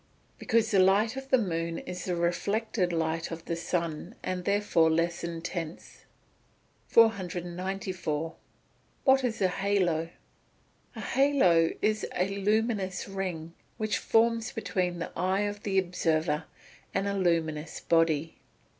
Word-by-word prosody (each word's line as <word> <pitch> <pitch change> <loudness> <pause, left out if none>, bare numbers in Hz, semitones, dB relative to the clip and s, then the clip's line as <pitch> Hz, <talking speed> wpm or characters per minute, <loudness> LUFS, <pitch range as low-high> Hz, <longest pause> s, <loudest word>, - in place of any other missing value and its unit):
_ - - -36
Because 225 -1 +1
the 195 - +4
light 200 +5 +4
of 270 0 -7
the 260 - +5
moon 165 -6 -2
is 180 -1 -6
the 180 - -1
reflected 185 +3 0
light 165 0 -1
of 165 0 -7
the 170 - -2
sun, 170 -2 -3
and 185 0 -2
is 180 - -10
therefore 200 -5 +3
less 170 +2 0
intense. 170 0 -6 0.8
494. 180 -5 0 0.7
What 265 -1 +5
is 225 -5 -1
a - - +5
halo? 180 -4 0 0.9
A - - -6
halo 225 -13 +3
is 215 0 +1
a 180 +2 +1
luminous 205 -2 0
ring, 180 -4 -4 0.2
which 215 -1 -1
forms 230 0 +2
between 180 -5 -2
the 165 - -5
eye 185 +3 +1
of 205 0 -3
the 195 -2 -1
observer 165 -4 +1 0.5
and 195 - +1
a 200 - 0
luminous 165 -5 0
body. 165 -1 +1
180 Hz, 135 wpm, -29 LUFS, 165-205 Hz, 0.9 s, the